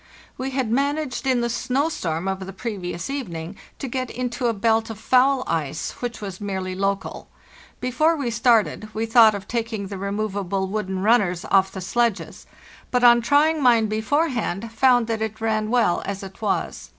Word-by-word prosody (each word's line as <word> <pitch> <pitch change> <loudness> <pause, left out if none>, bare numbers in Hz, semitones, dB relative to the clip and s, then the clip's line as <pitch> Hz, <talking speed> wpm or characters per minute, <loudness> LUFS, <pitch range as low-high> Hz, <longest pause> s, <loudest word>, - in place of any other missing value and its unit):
We 265 +1 -4
had 260 -4 -2
managed 280 +1 -1
in 255 -2 +2
the 235 - 0
snow 255 +5 0
storm 165 - -3
of 190 0 -3
the 195 - -7
pre 225 +3 -4
vious 175 -2 -5
evening 185 - -5 0.2
to 275 - -5
get 255 0 -3
into 245 0 -2
a - - +3
belt 225 +1 +1
of 225 - -6
foul 260 +3 +3
ice, 155 -2 -2
which 240 -2 -4
was 195 -2 -7
merely 190 -2 -3
local. 195 +1 -2 0.5
Before 305 +7 +2
we 270 -6 -2
started 230 -2 +2
we 220 +1 -1
thought 225 -2 +6
of 195 0 -7
taking 225 -4 -3
the 200 -2 -6
removable 200 -1 -2
wooden 190 -1 -3
runners 200 -6 +2
off 190 -1 +4
the 190 - -7
sledges, 235 +3 -1 0.4
but 250 -1 +1
on 240 -1 +7
trying 295 +5 +3
mine 235 -4 +5
beforehand 225 - -1
found 245 0 +4
that 225 -1 -3
it 220 0 -3
ran 215 -1 0
well 230 -7 +2
as 195 0 -5
it 195 +2 -11
was. 210 -3 -2
225 Hz, 180 wpm, -23 LUFS, 195-250 Hz, 0.5 s, on